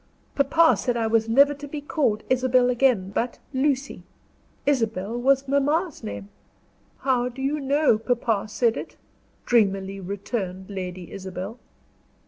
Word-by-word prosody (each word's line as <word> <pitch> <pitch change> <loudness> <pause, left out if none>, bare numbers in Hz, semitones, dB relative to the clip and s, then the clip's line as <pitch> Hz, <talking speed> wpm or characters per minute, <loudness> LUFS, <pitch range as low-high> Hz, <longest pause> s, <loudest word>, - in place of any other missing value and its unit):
Papa 285 +1 +4
said 240 +4 -1
I 230 - 0
was 225 0 +1
never 280 +5 +5
to 290 0 -9
be 295 +1 -5
called 280 -7 0
Isabel 255 -1 +3
again, 245 -7 +2
but 235 +4 -2 0.2
Lucy. 270 0 0 0.6
Isabel 225 -6 0
was 270 +2 +2
mamma's 290 +5 0
name." 100 -1 -6 0.7
"How 250 -2 +1
do 250 +2 -12
you 280 +3 -1
know 280 -4 +2
papa 225 -3 0
said 225 +2 +1
it?" - - -7 0.5
dreamily 195 -4 +1
returned 195 0 -5
Lady 180 -2 -6
Isabel. 190 +4 -6
240 Hz, 130 wpm, -24 LUFS, 200-275 Hz, 0.7 s, never